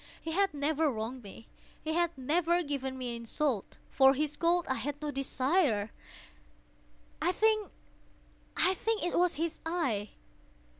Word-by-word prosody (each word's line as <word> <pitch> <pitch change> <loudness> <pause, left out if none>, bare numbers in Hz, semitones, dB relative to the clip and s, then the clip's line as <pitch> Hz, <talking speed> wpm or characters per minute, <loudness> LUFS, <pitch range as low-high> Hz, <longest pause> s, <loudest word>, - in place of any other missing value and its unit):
He 325 - -5
had 390 +3 +2
never 300 +2 +1
wronged 240 +1 -4
me. 210 +1 -12 0.4
He 315 - -1
had 340 -1 +1
never 340 +6 +2
given 270 -3 -3
me 245 -2 -3
insult. 235 0 -2
For 270 0 +6
his 300 +1 -1
gold 345 +1 +2
I - - +1
had 285 +2 -4
no 300 -1 -3
desire. 270 - +1 1.3
I 350 - +3
think 430 +1 +2 0.9
it 380 -1 +1
was 355 -1 +3
his 330 +2 -3
eye! 270 - -1
300 Hz, 135 wpm, -31 LUFS, 260-345 Hz, 1.3 s, For